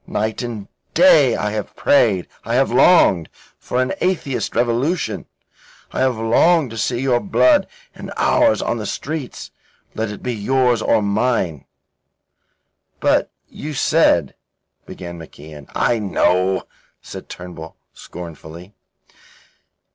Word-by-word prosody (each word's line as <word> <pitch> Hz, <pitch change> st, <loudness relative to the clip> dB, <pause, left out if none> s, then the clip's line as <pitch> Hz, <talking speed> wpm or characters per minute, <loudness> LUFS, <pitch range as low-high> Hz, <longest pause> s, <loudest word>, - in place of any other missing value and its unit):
Night 110 Hz, +3 st, -2 dB
and 115 Hz, -5 st, -6 dB, 0.3 s
day 150 Hz, -, +6 dB
I 105 Hz, -, -2 dB
have 105 Hz, -1 st, -5 dB
prayed 105 Hz, -10 st, +2 dB, 0.2 s
I 115 Hz, +2 st, -2 dB
have 135 Hz, 0 st, +2 dB
longed 120 Hz, -, +4 dB, 0.3 s
for 125 Hz, -, -3 dB
an 130 Hz, +6 st, 0 dB
atheist 175 Hz, -8 st, -1 dB
revolution 120 Hz, -, -1 dB, 0.6 s
I -, -, -4 dB
have 130 Hz, -3 st, +1 dB
longed 130 Hz, +6 st, +3 dB
to 115 Hz, -, -7 dB
see 120 Hz, +2 st, -1 dB
your 130 Hz, -3 st, +2 dB
blood 295 Hz, -, +3 dB, 0.3 s
and -, -, -9 dB
ours 295 Hz, -3 st, +3 dB
on 120 Hz, -, -1 dB
the 105 Hz, -, -4 dB
streets. 150 Hz, +1 st, -5 dB, 0.4 s
Let 110 Hz, 0 st, -3 dB
it 105 Hz, -, -9 dB
be 125 Hz, -, -2 dB
yours 120 Hz, +2 st, +1 dB
or 110 Hz, -1 st, +2 dB
mine?" 100 Hz, -, -1 dB, 1.3 s
"But -, -, +2 dB, 0.2 s
you 150 Hz, 0 st, -7 dB
said..." 135 Hz, -, +2 dB, 0.5 s
began 85 Hz, -1 st, -8 dB
MacIan. 75 Hz, -2 st, -12 dB
"I 120 Hz, -, +1 dB
know," 95 Hz, -2 st, +1 dB, 0.4 s
said -, -, -10 dB
Turnbull 85 Hz, -2 st, -9 dB, 0.2 s
scornfully. 85 Hz, +2 st, -11 dB
115 Hz, 125 wpm, -19 LUFS, 95-135 Hz, 1.3 s, day